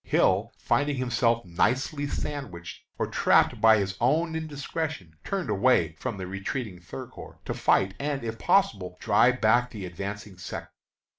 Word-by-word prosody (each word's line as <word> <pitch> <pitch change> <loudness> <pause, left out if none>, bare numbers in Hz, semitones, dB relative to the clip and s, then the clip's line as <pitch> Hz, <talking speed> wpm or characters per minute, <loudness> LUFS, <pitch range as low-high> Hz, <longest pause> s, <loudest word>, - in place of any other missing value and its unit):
Hill, - - +2
finding 145 0 +1
himself 120 -3 +1
nicely 130 - 0
sandwiched 125 -14 -6
or - - 0
trapped - - +3
by 110 -1 +7
his 95 -2 -1
own 160 +7 +2
indiscretion, 155 - -4
turned 195 -3 -2
away 100 -6 +3
from 120 -5 -4
the 95 - -5
retreating 95 +2 -4
Third 85 - -8
Corps, - - -11
to - - -2
fight, 95 0 +2
and, 140 -2 -2
if 115 -1 -4
possible, 95 - +1
drive 125 +1 +3
back 120 +3 +3
the 105 -5 -7
advancing 100 +2 -6
Second. 90 - -6
115 Hz, 150 wpm, -27 LUFS, 95-140 Hz, -, by